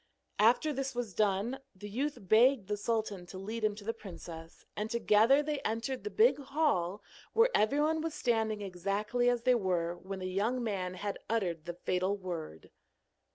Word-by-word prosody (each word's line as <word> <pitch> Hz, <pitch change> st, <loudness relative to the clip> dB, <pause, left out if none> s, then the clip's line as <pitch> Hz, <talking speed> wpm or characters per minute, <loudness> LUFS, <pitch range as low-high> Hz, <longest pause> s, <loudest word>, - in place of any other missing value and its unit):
After 245 Hz, +8 st, +4 dB
this 270 Hz, -1 st, -3 dB
was 240 Hz, -5 st, -3 dB
done, 210 Hz, +6 st, +1 dB, 0.2 s
the 205 Hz, +2 st, -8 dB
youth 275 Hz, +8 st, -2 dB
begged 220 Hz, +3 st, +4 dB
the 210 Hz, -, +1 dB
sultan 205 Hz, -4 st, -2 dB
to 185 Hz, -, -9 dB
lead 215 Hz, +4 st, -5 dB
him 210 Hz, -1 st, +2 dB
to 210 Hz, -, -10 dB
the 230 Hz, +3 st, -2 dB
princess, 170 Hz, -6 st, -10 dB
and 210 Hz, +1 st, -3 dB
together 235 Hz, +5 st, +4 dB
they 295 Hz, -1 st, -2 dB
entered 245 Hz, +2 st, -3 dB
the 420 Hz, -, -3 dB
big 440 Hz, -4 st, +4 dB
hall, 270 Hz, -, 0 dB, 0.3 s
where 460 Hz, +2 st, +5 dB
everyone 295 Hz, +8 st, +2 dB
was 325 Hz, -1 st, -3 dB
standing 220 Hz, -3 st, 0 dB
exactly 200 Hz, +6 st, 0 dB
as 240 Hz, -1 st, 0 dB
they 255 Hz, 0 st, +5 dB
were 180 Hz, -6 st, 0 dB
when 190 Hz, +2 st, -7 dB
the 185 Hz, 0 st, -4 dB
young 225 Hz, +6 st, 0 dB
man 185 Hz, -5 st, -2 dB
had 200 Hz, +2 st, -4 dB
uttered 175 Hz, -8 st, -1 dB
the 175 Hz, 0 st, -5 dB
fatal 185 Hz, +3 st, 0 dB
word. 165 Hz, -, -7 dB
215 Hz, 175 wpm, -32 LUFS, 190-250 Hz, 0.3 s, where